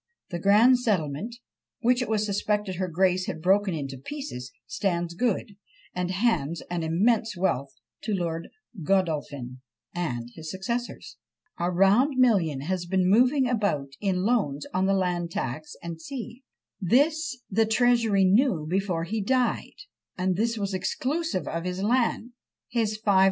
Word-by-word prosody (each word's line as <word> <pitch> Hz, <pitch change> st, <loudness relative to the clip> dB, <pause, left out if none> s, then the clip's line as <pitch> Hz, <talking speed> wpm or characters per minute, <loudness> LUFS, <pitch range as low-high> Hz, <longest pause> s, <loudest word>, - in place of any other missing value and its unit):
The 175 Hz, -, -3 dB
grand 220 Hz, +7 st, +5 dB
settlement, 205 Hz, -, -1 dB, 0.5 s
which 245 Hz, +1 st, +3 dB
it 250 Hz, -, -2 dB
was 215 Hz, -1 st, +1 dB
suspected 205 Hz, -2 st, -1 dB
her 185 Hz, 0 st, -1 dB
grace 185 Hz, +2 st, +1 dB
had -, -, -4 dB
broken 185 Hz, -4 st, +1 dB
to 135 Hz, 0 st, -8 dB
pieces, 135 Hz, -, -6 dB
stands 170 Hz, -1 st, -1 dB
good, 210 Hz, 0 st, -1 dB, 0.4 s
and 180 Hz, 0 st, -2 dB
hands 180 Hz, -6 st, 0 dB
an 175 Hz, -1 st, -1 dB
immense 210 Hz, +6 st, +1 dB
wealth 140 Hz, -7 st, 0 dB, 0.4 s
to 215 Hz, -2 st, 0 dB
Lord 165 Hz, -2 st, -3 dB, 0.3 s
Godolphin 145 Hz, -8 st, -1 dB, 0.3 s
and 125 Hz, -10 st, -3 dB
his 160 Hz, -1 st, -8 dB
successors. 235 Hz, +7 st, -4 dB, 0.4 s
A 175 Hz, +1 st, +1 dB
round 200 Hz, -, +4 dB
million 190 Hz, -, +3 dB
has 175 Hz, +3 st, -2 dB
been 185 Hz, 0 st, +2 dB
moving 250 Hz, +6 st, +4 dB
about 200 Hz, -, 0 dB
in 190 Hz, -3 st, 0 dB
loans 195 Hz, -, 0 dB
on 190 Hz, +1 st, +1 dB
the 195 Hz, -, +3 dB
land 180 Hz, -2 st, 0 dB
tax, 150 Hz, 0 st, -4 dB, 0.2 s
&c. 240 Hz, +7 st, -7 dB, 0.4 s
This 285 Hz, -, +2 dB
the 220 Hz, +3 st, +3 dB
Treasury 225 Hz, -3 st, +3 dB
knew 195 Hz, -, +3 dB
before 180 Hz, -1 st, 0 dB
he 215 Hz, +6 st, -2 dB
died, 255 Hz, -, 0 dB, 0.3 s
and 185 Hz, 0 st, +1 dB
this 230 Hz, +4 st, 0 dB
was 200 Hz, -2 st, -2 dB
exclusive 260 Hz, -, -2 dB
of 165 Hz, 0 st, -3 dB
his 180 Hz, +1 st, -3 dB
'land;' 240 Hz, +1 st, +1 dB, 0.4 s
his 215 Hz, -3 st, -1 dB
5000_l. 200 Hz, -3 st, +3 dB
190 Hz, 145 wpm, -26 LUFS, 170-230 Hz, 0.5 s, grand